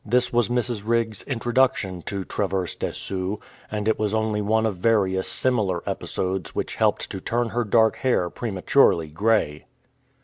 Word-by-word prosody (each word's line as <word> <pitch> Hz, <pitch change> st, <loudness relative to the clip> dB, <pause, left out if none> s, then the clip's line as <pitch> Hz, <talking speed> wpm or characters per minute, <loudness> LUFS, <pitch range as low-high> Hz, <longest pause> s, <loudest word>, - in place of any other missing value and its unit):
This 125 Hz, +3 st, +1 dB
was 120 Hz, -3 st, +2 dB
Mrs. 120 Hz, -3 st, -1 dB
Riggs' 115 Hz, -2 st, 0 dB
introduction 120 Hz, -7 st, +1 dB
to 100 Hz, -2 st, -2 dB
Traverse 95 Hz, -2 st, -2 dB
des -, -, -3 dB
Sioux, 95 Hz, +2 st, -3 dB, 0.3 s
and 105 Hz, 0 st, -3 dB
it 110 Hz, -, +2 dB
was 105 Hz, 0 st, 0 dB
only 110 Hz, -1 st, 0 dB
one 110 Hz, +2 st, +2 dB
of 105 Hz, -4 st, -1 dB
various 95 Hz, -2 st, +2 dB
similar 105 Hz, -9 st, 0 dB
episodes 95 Hz, -2 st, -3 dB
which -, -, -2 dB
helped -, -, +1 dB
to -, -, -4 dB
turn 120 Hz, 0 st, -1 dB
her 120 Hz, +2 st, 0 dB
dark 110 Hz, +1 st, +3 dB
hair 90 Hz, -9 st, +1 dB
prematurely 95 Hz, -6 st, +2 dB
grey. 90 Hz, -3 st, 0 dB
110 Hz, 160 wpm, -24 LUFS, 95-115 Hz, 0.3 s, dark